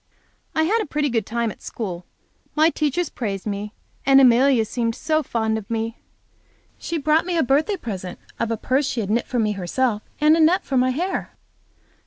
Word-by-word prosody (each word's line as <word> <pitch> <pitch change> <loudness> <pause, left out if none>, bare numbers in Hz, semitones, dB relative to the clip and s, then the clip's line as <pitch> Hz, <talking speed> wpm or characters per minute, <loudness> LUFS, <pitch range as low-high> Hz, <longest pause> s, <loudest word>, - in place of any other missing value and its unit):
I 315 - +3
had 435 +8 +2
a - - -4
pretty 295 0 0
good 225 -4 -1
time 235 -1 -1
at - - -14
school. 180 -6 -6 0.5
My 315 +2 +4
teachers 305 +2 -1
praised 200 -6 -4
me, 205 0 -4 0.3
and 270 0 +6
Amelia 255 -1 +5
seemed 230 0 -2
so 310 0 0
fond 220 -5 -1
of 210 +1 -13
me! 225 0 -3 0.8
She 335 - -3
brought 310 +2 +2
me 350 -2 0
a 325 - +3
birthday 300 - +1
present 190 - -6 0.2
of 230 - 0
a 230 - -1
purse 265 +5 0
that - - -1
she 245 - -2
had 205 -1 -3
knit 235 +2 0
for 250 - -2
me 215 -2 +2
herself, 210 +4 -1 0.2
and 305 +1 +5
a - - +1
net 330 +4 +4
for 270 - -3
my 255 0 +3
hair. 350 +9 -3
255 Hz, 205 wpm, -22 LUFS, 220-305 Hz, 0.8 s, and